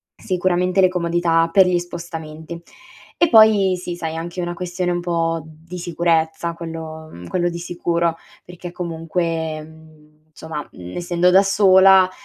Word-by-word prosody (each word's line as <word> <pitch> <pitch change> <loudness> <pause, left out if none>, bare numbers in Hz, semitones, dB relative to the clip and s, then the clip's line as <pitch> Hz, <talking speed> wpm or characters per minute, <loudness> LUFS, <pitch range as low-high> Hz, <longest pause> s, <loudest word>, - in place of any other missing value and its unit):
sicuramente 185 0 0
le 185 - +5
comodità 170 -2 +1
per 190 -2 +6
gli 180 -1 +2
spostamenti. 170 -1 -8 0.6
E 340 - +3
poi 210 -5 +5
sì, 175 -1 -5
sai, 160 -1 -5
anche 170 +2 -5
una 175 0 -3
questione 180 0 -3
un 175 - -1
po' 165 -1 -1
di 160 +3 -11
sicurezza 170 -1 -1
quello, 160 -1 -8
mhmm, 85 0 -11
quello 175 -1 0
di 170 0 -6
sicuro 170 -1 -1 0.3
perché 175 0 -10
comunque, 165 -2 -3
mhmm, 155 -1 -19
somma, 160 -2 -7
mhmm, 90 0 -10
essendo 175 0 +1
da 190 +2 +6
sola 190 -1 +5
170 Hz, 145 wpm, -20 LUFS, 160-180 Hz, 0.6 s, per